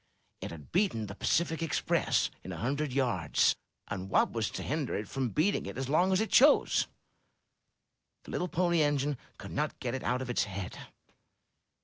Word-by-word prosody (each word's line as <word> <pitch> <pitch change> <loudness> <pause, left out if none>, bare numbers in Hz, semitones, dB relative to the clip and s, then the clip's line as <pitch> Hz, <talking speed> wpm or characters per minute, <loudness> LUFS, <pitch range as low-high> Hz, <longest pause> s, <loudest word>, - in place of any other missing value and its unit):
It - - -4
had 80 -3 -11
beaten 175 - +1
the 100 - -7
Pacific 165 - 0
Express 165 -3 +1
in - - -7
a - - -5
hundred 140 +5 -1
yards, 120 - +2 0.3
and 95 -2 -5
what - - +3
was 115 -2 -1
to - - -5
hinder 145 -2 -2
it 105 0 -3
from 135 -2 -2
beating 165 - +1
it - - -6
as 135 0 -3
long 180 +6 +3
as 190 - +3
it 220 - -1
chose? 285 +3 +5 1.4
The - - -10
little 180 - -1
Pony 170 -1 +2
Engine 145 -1 +1 0.2
could - - -9
not 150 +1 -2
get 125 -2 -3
it 130 - -3
out 125 +1 0
of 125 - -8
its - - +1
head. 95 -2 -6
135 Hz, 180 wpm, -31 LUFS, 115-165 Hz, 1.4 s, chose